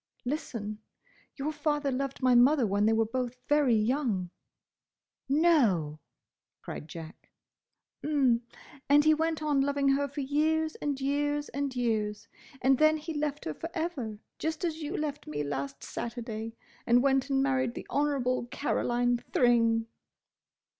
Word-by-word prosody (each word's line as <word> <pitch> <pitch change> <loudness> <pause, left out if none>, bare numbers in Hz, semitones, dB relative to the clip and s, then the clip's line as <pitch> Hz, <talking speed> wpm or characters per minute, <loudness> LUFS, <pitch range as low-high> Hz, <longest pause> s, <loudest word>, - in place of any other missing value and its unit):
"Listen. 230 -7 -4 0.6
Your 295 +2 -2
father 295 -2 -1
loved 270 +1 -3
my 255 -1 +5
mother 250 +2 +5
when 205 +1 +2
they 225 - +4
were 225 0 +3
both 250 +2 -3
very 290 -5 +4
young—" 215 -5 0 1.0
"No!" 240 - +3 0.6
cried 150 - -7
Jack. 160 0 -10 0.7
"'M. 270 -6 +2 0.5
And 290 +1 +6
he 310 - +6
went 320 0 -1
on 290 -3 +2
loving 280 0 +1
her 280 +1 +2
for 285 +1 -5
years 310 +3 +1
and 285 -2 -2
years 290 +2 0
and 280 -1 -3
years! 220 -4 -1 0.4
And 265 0 +4
then 310 0 +5
he 315 +2 -6
left 295 -1 -2
her 155 - -2
for 330 - -6
ever, 300 - -3 0.2
just 320 +2 -2
as 325 -1 -3
you 300 +1 -3
left 295 -1 -4
me 150 -1 -3
last 140 -1 -4
Saturday; 230 -1 -5 0.3
and 245 +1 +5
went 270 0 +2
and 270 -1 +2
married 260 -3 0
the - - -6
Honourable 270 -4 0
Caroline 245 -2 0
Thring." 230 -2 +3
270 Hz, 145 wpm, -29 LUFS, 230-295 Hz, 1.0 s, And